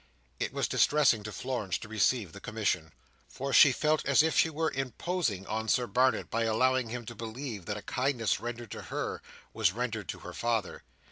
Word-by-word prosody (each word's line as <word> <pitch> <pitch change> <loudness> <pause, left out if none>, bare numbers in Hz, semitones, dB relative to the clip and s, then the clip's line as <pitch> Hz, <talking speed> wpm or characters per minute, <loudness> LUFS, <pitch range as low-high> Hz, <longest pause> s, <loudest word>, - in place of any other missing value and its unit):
It - - -1
was - - -1
distressing 145 -7 +3
to 105 - -5
Florence 110 -4 -2
to - - -9
receive 110 -3 +1
the - - -9
commission, 100 -9 -1 0.4
for 135 0 -4
she 140 - +8
felt 155 +3 +1
as 140 +2 +5
if 160 - +1
she 165 - +4
were 160 +1 -1
imposing 135 - -2
on 110 +1 -3
Sir 125 +2 +2
Barnet 130 +2 +1
by 115 0 +1
allowing 130 +2 +2
him 120 0 -5
to 120 - -7
believe 115 -3 -6
that 105 - -2
a 105 - -8
kindness 125 -4 0
rendered 120 -2 -6
to - - -6
her, - - -4 0.3
was 90 - +2
rendered 110 -5 -3
to - - -4
her - - -8
father. 115 -3 -1
120 Hz, 195 wpm, -30 LUFS, 110-130 Hz, 0.4 s, she